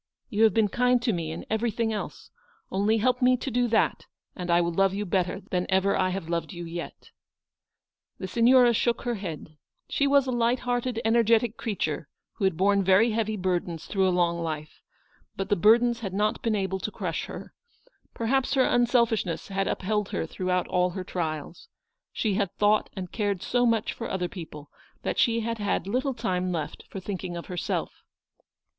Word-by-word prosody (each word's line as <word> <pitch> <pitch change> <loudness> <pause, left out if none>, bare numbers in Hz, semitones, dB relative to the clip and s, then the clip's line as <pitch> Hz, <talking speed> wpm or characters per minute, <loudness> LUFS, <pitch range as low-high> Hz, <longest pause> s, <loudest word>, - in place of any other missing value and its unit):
You 220 +2 +4
have 220 - +4
been 220 -2 +4
kind 250 +4 +2
to 230 -3 +2
me 165 -3 -3
in 165 - -6
everything 225 0 0
else. 210 - -6 0.4
Only 205 +3 +2
help 250 +4 +1
me 250 0 +5
to 265 - -4
do 245 +1 +2
that 225 -1 +1 0.3
and 180 -2 -5
I 170 0 +5
will 170 0 +1
love 195 +2 +2
you 205 +1 -2
better 185 +1 -1
than 180 -1 0
ever 190 +1 +2
I 185 -1 +2
have 185 -3 -4
loved 170 +3 -2
you 175 -1 -6
yet." 170 +1 -7 1.1
The 190 - -5
Signora 240 +4 +5
shook 235 +1 0
her 245 -2 -1
head. 165 -7 -7 0.3
She 280 - +1
was 280 -1 +4
a 260 - -2
light 240 +1 +1
hearted, 245 -1 -1
energetic 230 0 +3
creature, 220 -3 -3 0.2
who 200 - -2
had 190 -4 +1
borne 200 +2 +3
very 195 +5 +4
heavy 220 -1 -1
burdens 180 -3 -2
through 190 -2 +1
a - - +3
long 175 -1 +1
life; 155 -2 -5 0.5
but 195 +1 -4
the 205 - +4
burdens 235 +5 +4
had 195 -5 -5
not 210 +1 0
been 225 -2 0
able 190 -1 -1
to 215 - -3
crush - - -3
her. - - -9 0.6
Perhaps 265 +4 +1
her 260 -1 +4
unselfishness 235 -8 +1
had 195 0 -1
upheld 210 +1 -1
her - - -2
throughout 180 +2 -1
all 180 0 +2
her 185 +1 -5
trials. 165 - -4 0.4
She 215 -3 -1
had 195 -2 0
thought 210 +1 +2
and 185 -3 -6
cared 205 -4 -1
so 245 0 +2
much 225 -2 +1
for 230 - -6
other 180 -2 -1
people, 150 -5 -9 0.3
that - - -2
she 230 -2 +3
had 230 0 -3
had 205 -4 -1
little 255 +6 -1
time 185 -6 -1
left 160 -4 -4
for 195 - -6
thinking 185 -2 -5
of 170 - -7
herself. 180 -2 -3
205 Hz, 190 wpm, -27 LUFS, 180-230 Hz, 1.1 s, me